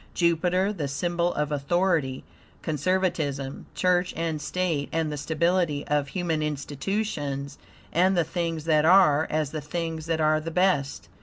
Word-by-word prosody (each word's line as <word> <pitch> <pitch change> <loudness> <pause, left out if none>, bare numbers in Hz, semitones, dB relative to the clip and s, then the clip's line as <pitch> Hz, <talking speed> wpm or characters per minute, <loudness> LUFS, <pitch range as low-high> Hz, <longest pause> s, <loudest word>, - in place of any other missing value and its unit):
Jupiter, 180 +3 +2
the 155 -8 -3
symbol 170 +5 0
of 150 0 -1
authority, 150 -2 0 0.4
conservatism, 150 -4 -1
church, 180 0 +1
and 160 -2 -2
state, 160 -3 -1
and 160 -1 -1
the 150 - -4
stability 160 0 0
of 145 -1 +1
human 165 -1 -1
institutions, 145 -1 -3 0.3
and 185 +3 +3
the 170 - +4
things 165 -1 -3
that 155 -2 +3
are, 160 -3 +5
as 155 -2 -1
the 155 - -4
things 165 +1 -4
that 165 -1 0
are 155 0 +3
the 160 +2 -5
best. 165 -5 +1
160 Hz, 145 wpm, -26 LUFS, 150-175 Hz, 0.4 s, are